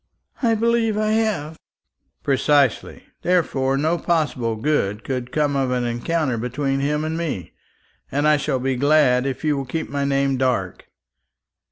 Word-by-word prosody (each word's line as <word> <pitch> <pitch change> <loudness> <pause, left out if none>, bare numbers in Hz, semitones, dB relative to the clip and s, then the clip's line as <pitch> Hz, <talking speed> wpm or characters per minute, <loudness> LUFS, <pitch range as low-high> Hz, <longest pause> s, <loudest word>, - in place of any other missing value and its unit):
"I 230 -3 +3
believe 230 -1 +1
I 215 0 +1
have." 200 -9 -1 0.6
"Precisely. 140 -1 +1 0.2
Therefore 135 -7 +1
no 160 +4 +1
possible 150 -9 0
good 110 -5 -1
could 125 -2 -4
come 145 0 +1
of 135 -2 +1
an 125 -1 0
encounter 120 +2 -1
between 135 +3 -1
him 150 +2 0
and 160 +1 -2
me, 150 - -4 0.6
and 145 +2 +1
I 150 0 +5
shall 140 -1 -1
be 130 +1 -1
glad 135 -2 +3
if 135 +2 -4
you 150 -2 +2
will 135 -1 -3
keep 160 +5 -4
my 140 0 -1
name 140 -1 +1
dark." 125 -8 -1
140 Hz, 155 wpm, -22 LUFS, 130-160 Hz, 0.6 s, I